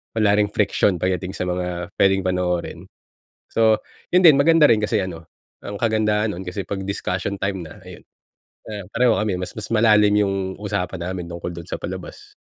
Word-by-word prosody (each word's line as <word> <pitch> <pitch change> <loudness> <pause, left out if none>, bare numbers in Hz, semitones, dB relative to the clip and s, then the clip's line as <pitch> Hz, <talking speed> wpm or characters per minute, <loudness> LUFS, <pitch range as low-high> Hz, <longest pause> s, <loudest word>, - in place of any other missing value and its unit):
wala 110 -2 +3
ring 105 - +3
friction 100 -1 +1
pagdating 90 +1 -2
sa - - -3
mga 90 0 -3
puwedeng 95 -1 +3
panoorin. 90 -1 -1 0.7
So, 110 -1 +3 0.3
'yon 180 - +6
din, 160 -6 +8
maganda 155 +1 +5
rin 115 - +5
kasi 105 0 0
ano, 85 -3 -6 0.4
ang 100 0 -6
kagandahan 110 -1 +1
noon 95 - -7
kasi 90 +2 -4
'pag 95 +1 -5
discussion 95 -1 -3
time 95 -3 -2
na, 80 - -13
ayun, - - -13 0.6
ah, 105 -3 -6
pareho 120 -1 +3
kami. 105 -2 0
Mas, 90 - -6
mas 110 +1 -5
malalim 105 -2 +5
'yung 100 -1 0 0.3
usapan 95 -4 -3
namin 90 -2 -4
tungkol 85 0 -6
do'n 85 - -7
sa - - -6
palabas. - - -8
100 Hz, 180 wpm, -22 LUFS, 90-110 Hz, 0.7 s, din